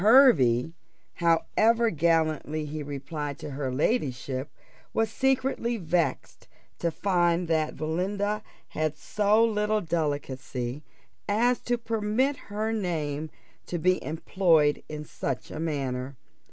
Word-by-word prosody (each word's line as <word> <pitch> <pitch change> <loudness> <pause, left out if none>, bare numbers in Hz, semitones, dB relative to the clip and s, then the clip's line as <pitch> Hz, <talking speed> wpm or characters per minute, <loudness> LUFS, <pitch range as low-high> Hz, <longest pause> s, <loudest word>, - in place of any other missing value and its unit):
Hervey, 165 - +6 0.4
however 220 +7 +3
gallantly 155 -2 +1
he 150 +1 -5
replied 145 0 -5
to 145 - -7
her 135 -1 -3
ladyship, 135 - -1 0.5
was 225 0 +1
secretly 260 -3 +1
vexed 170 - -1 0.3
to 170 - +1
find 175 -1 +1
that 155 -1 0
Belinda 200 +6 -1 0.3
had 155 -1 -2
so 210 +2 +3
little 215 -1 +1
delicacy 145 -6 -3 0.5
as 240 +4 +3
to 245 0 -1
permit 230 +4 0
her 215 +2 -1
name 160 -7 -2 0.4
to 175 - -2
be 185 +2 +2
employed 160 -2 +2
in 150 -1 -6
such 135 -3 -4
a 155 - -5
manner. 135 -4 -3
165 Hz, 115 wpm, -27 LUFS, 145-210 Hz, 0.5 s, Hervey